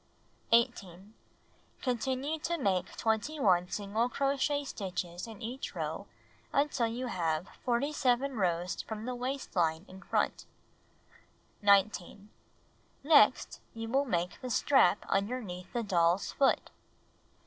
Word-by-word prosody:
18. 210 -5 +1 0.7
Continue 265 +4 -1
to 340 +2 -2
make 190 - -1
21 220 - +1
single 215 +4 -1
crochet 280 +2 0
stitches 180 -6 -5
in 225 -2 -10
each 250 +4 -5
row - - -4 0.4
until 275 -4 +1
you 240 +3 -4
have 170 -6 -1
47 260 +1 +1
rows 180 -3 -1
from 220 0 -6
the 250 - -3
waist 255 +1 -4
line 165 0 +1
in 190 +1 -12
front. - - -1 1.1
19. 200 0 +2 0.7
Next 285 -6 +4 0.2
you 225 0 -5
will 270 +4 +2
make 175 -7 -2
the 255 - -5
strap 240 -5 +3
underneath 195 -3 -2
the 240 - -2
doll's 175 -2 +2
foot. 275 - +1
225 Hz, 115 wpm, -31 LUFS, 185-260 Hz, 1.1 s, Next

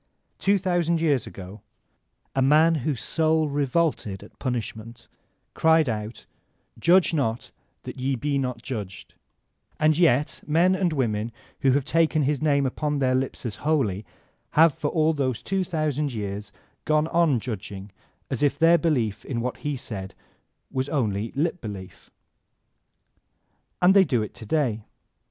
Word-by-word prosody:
Two 200 +1 +3
thousand 175 -3 +1
years 150 -6 +1
ago 95 +2 -10 0.7
a 135 - +2
man 155 +5 +5
whose 125 -4 -2
soul 160 -1 +2
revoked 145 +1 0
at 95 -2 -9
punishment, 115 -2 -5 0.5
cried 160 -1 +4
out: 110 0 -4 0.5
"Judge 175 +1 +4
not, 120 -7 -1 0.3
that - - -8
ye 135 +1 0
be 140 +3 -1
not 125 -3 -3
judged," 105 -7 -6 0.7
and 155 0 +4
yet 150 -4 +2
men 170 +5 +3
and 185 -2 +1
women 115 -6 -1 0.3
who 135 -2 +3
have 140 -1 +1
taken 160 0 +2
his 145 +1 0
name 140 -2 +2
upon 150 +3 -1
their 130 -2 +1
lips 130 0 -2
as 110 - -4
holy, 130 -11 0 0.5
have 165 -1 +7
for 145 - -3
all 160 +1 +2
those 130 -5 -2
two 195 0 0
thousand 150 -5 -1
years 105 -1 -5 0.3
gone 155 0 +2
on 165 -7 +3
judging 105 -3 -6 0.4
as - - -2
if 145 -2 +2
their 165 +1 +5
belief 115 - 0
in 125 -4 -3
what 125 +2 -3
he 145 -2 -3
said 95 -5 -6 0.6
was 130 +1 -2
only 110 -7 -1
lip 165 +5 -1
belief; 100 -4 -9 1.7
and 180 +1 +5
they 195 -1 +7
do 125 -10 0
it 105 - -7
to 115 -3 -10
day. 125 -8 0
140 Hz, 150 wpm, -25 LUFS, 115-160 Hz, 1.7 s, have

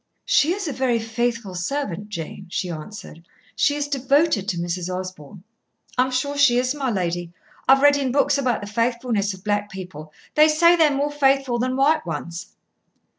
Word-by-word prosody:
"She 310 - +3
is 400 -3 -4
a 290 - -2
very 255 -3 +1
faithful 230 -2 -2
servant, 205 0 -3
Jane," 185 0 -7
she 180 0 -3
answered. 165 +1 -9 0.3
"She 285 +6 +2
is 290 0 -2
devoted 275 - +1
to 175 - -2
Mrs. 175 +1 -3
Osborn." 185 -1 -7 0.5
"I 255 - +3
am - - -4
sure 260 +3 -1
she 260 -4 +5
is, 255 +1 +1
my 275 -3 -2
lady. 175 -4 -2 0.4
I've 270 +1 +5
read 290 0 +6
in 270 -3 -1
books 280 +1 +2
about 250 -5 0
the 205 - -6
faithfulness 230 -2 -1
of 185 - -17
black 205 -1 -1
people. 180 -6 -9 0.2
They 305 +1 +6
say 335 +3 +5
they're 320 -3 +4
more 285 +1 -1
faithful 270 -4 +2
than 255 +1 -1
white 290 +4 +3
ones." 170 +1 -6
240 Hz, 180 wpm, -22 LUFS, 185-280 Hz, 0.5 s, read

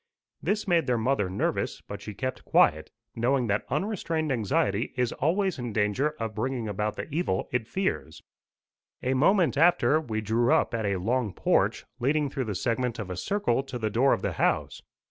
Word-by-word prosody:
This 210 0 -1
made 170 -5 +2
their 125 -1 +2
mother 110 -4 +1
nervous, 95 +3 -1
but - - -8
she 105 - -7
kept 130 +5 -4
quiet, - - +3 0.3
knowing 125 +2 +1
that 105 -1 -1
unrestrained 165 - -1
anxiety 105 -1 0
is 125 -2 +1
always 185 +3 0
in 120 -3 -4
danger 110 +9 +1
of 110 -1 -3
bringing 120 +1 -2
about 105 +1 -2
the - - -5
evil 155 - 0
it 120 -3 -1
fears. 185 - -3 0.8
A 130 - +1
moment 165 +4 +3
after, 165 -2 +4
we 110 -7 -3
drew 115 +3 +1
up - - +2
at 110 -2 -1
a 100 - +1
long 110 +2 -1
porch, - - +1
leading 145 +2 +1
through 135 -3 -2
the 105 -3 -3
segment 120 +3 -1
of 100 -4 -5
a - - -3
circle 135 - 0
to 135 -2 -6
the 110 -2 -2
door 130 +6 +3
of - - +1
the - - -1
house. - - 0
125 Hz, 185 wpm, -27 LUFS, 110-150 Hz, 0.8 s, after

